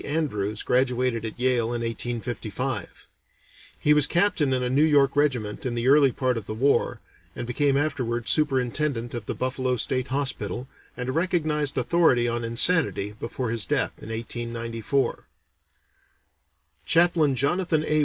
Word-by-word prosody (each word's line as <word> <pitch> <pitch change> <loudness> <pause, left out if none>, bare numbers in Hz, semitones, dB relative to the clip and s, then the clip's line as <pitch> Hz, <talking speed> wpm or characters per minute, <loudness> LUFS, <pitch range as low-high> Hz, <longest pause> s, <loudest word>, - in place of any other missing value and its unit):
Andrews 110 -9 -2
graduated 125 -2 +1
at 110 - -7
Yale 125 -2 +2
in 120 +1 -3
1855. 115 -1 -4 0.7
He 150 - +4
was 150 -1 +4
captain 175 -6 +2
in 130 -1 0
a 125 - -1
New 140 +4 +3
York 140 -3 +3
regiment 125 -8 0
in 125 -2 -2
the 120 +1 -1
early 140 -1 +6
part 125 -1 -1
of 105 - -6
the 110 - -4
war, 135 +5 +1 0.4
and 120 - -5
became 135 +3 +1
afterward 125 -5 -1
superintendent 130 -3 +1
of 115 -4 -6
the - - -3
Buffalo 130 0 -1
State 130 +2 0
Hospital, 130 -3 -3 0.3
and 125 0 -4
a - - +1
recognized 155 -3 0
authority 130 -3 +3
on 120 0 -2
insanity 115 - +2
before 115 0 -3
his 115 -2 +1
death 85 - 0
in - - -9
1894. 115 +2 -3 1.6
Chaplain 165 -4 +3
Jonathan 160 +3 0
A. 155 0 +2
130 Hz, 145 wpm, -25 LUFS, 115-145 Hz, 1.6 s, early